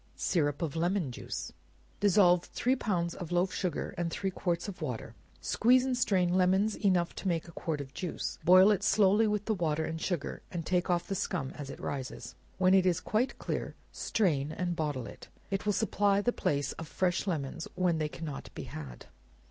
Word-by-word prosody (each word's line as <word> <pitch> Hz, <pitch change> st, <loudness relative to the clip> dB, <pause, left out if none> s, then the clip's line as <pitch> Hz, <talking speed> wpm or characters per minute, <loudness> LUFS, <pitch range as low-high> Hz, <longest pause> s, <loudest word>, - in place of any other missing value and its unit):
Syrup 145 Hz, -2 st, 0 dB
of 160 Hz, -1 st, -3 dB
Lemon 170 Hz, -3 st, 0 dB
Juice. -, -, -6 dB, 0.5 s
Dissolve 180 Hz, -3 st, +5 dB
three 255 Hz, +2 st, 0 dB
pounds 175 Hz, -8 st, -1 dB
of 175 Hz, -2 st, -7 dB
loaf 180 Hz, +1 st, +1 dB
sugar 180 Hz, -6 st, -2 dB
in 170 Hz, -1 st, 0 dB
three 190 Hz, +3 st, -2 dB
quarts 175 Hz, -1 st, -2 dB
of 195 Hz, -2 st, -7 dB
water, -, -, -4 dB, 0.3 s
squeeze 250 Hz, +2 st, +4 dB
and 260 Hz, -1 st, 0 dB
strain 185 Hz, -7 st, +2 dB
lemons 190 Hz, +3 st, +3 dB
enough 185 Hz, -4 st, +1 dB
to -, -, -5 dB
make 170 Hz, -2 st, 0 dB
a -, -, -10 dB
quart 160 Hz, -2 st, -3 dB
of 135 Hz, -1 st, -7 dB
juice; 180 Hz, -, -4 dB
boil 185 Hz, +3 st, +7 dB
it 200 Hz, -, +1 dB
slowly 205 Hz, +1 st, +4 dB
with 210 Hz, -1 st, -1 dB
the 220 Hz, -, +1 dB
water 160 Hz, -4 st, 0 dB
and 160 Hz, 0 st, -4 dB
sugar, 170 Hz, -6 st, -2 dB
and 170 Hz, -3 st, -4 dB
take 180 Hz, +1 st, +1 dB
off 175 Hz, -1 st, +1 dB
the -, -, -2 dB
scum 135 Hz, -7 st, -2 dB
as 145 Hz, -2 st, -8 dB
it 135 Hz, -, -8 dB
rises; 130 Hz, -3 st, -5 dB, 0.2 s
when 185 Hz, 0 st, +4 dB
it 190 Hz, -1 st, +5 dB
is 180 Hz, -1 st, +2 dB
quite 225 Hz, +7 st, 0 dB
clear, -, -, -4 dB, 0.2 s
strain 155 Hz, -9 st, 0 dB
and 175 Hz, +2 st, -2 dB
bottle 145 Hz, -6 st, -2 dB
it. -, -, -11 dB, 0.2 s
It 195 Hz, +1 st, -2 dB
will -, -, +4 dB
supply 205 Hz, -2 st, +2 dB
the 245 Hz, +4 st, +1 dB
place 145 Hz, -1 st, 0 dB
of 165 Hz, -, -7 dB
fresh 185 Hz, +3 st, 0 dB
lemons 160 Hz, -2 st, -3 dB
when 180 Hz, -3 st, +1 dB
they 155 Hz, -1 st, -1 dB
cannot 150 Hz, -3 st, -6 dB
be -, -, -5 dB
had. 70 Hz, -6 st, -8 dB
180 Hz, 195 wpm, -31 LUFS, 160-195 Hz, 0.5 s, boil